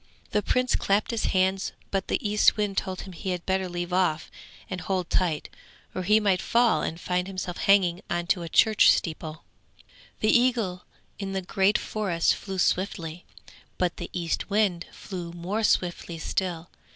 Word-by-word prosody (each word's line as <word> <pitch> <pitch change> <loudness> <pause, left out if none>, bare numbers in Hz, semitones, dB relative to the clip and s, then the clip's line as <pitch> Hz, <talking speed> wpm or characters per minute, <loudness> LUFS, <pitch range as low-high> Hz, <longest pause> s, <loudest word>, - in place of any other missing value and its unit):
The 210 - +2
Prince 250 +4 +1
clapped 200 +4 +1
his 230 - -1
hands, 190 +1 +1 0.2
but 195 -1 -1
the - - +1
Eastwind 210 -1 +3
told 190 -1 -2
him 190 - -9
he 185 +3 -5
had 180 -2 -3
better 190 -1 0
leave 175 0 -4
off 180 -4 +1 0.4
and 185 -1 -5
hold 185 -3 -2
tight, 165 -5 +1 0.5
or 185 - -3
he 210 +4 +4
might 195 -4 +2
fall 235 -1 +3
and 165 - -3
find 180 0 -1
himself 185 -2 -5
hanging 185 -3 +3
on 175 0 -1
to 175 +1 +1
a 170 - -5
church 215 +5 +6
steeple. 160 -1 -3 0.8
The 215 - +4
eagle 230 -7 +1 0.3
in 195 -1 -4
the 190 - -1
great 195 +2 +2
forest 190 -6 0
flew 195 -1 -6
swiftly, 175 -3 -1 0.5
but 180 -1 0
the - - -6
Eastwind 180 +1 0
flew 175 -3 -7
more 180 +6 -3
swiftly 175 -4 0
still. 175 0 -3
185 Hz, 165 wpm, -26 LUFS, 175-200 Hz, 0.8 s, church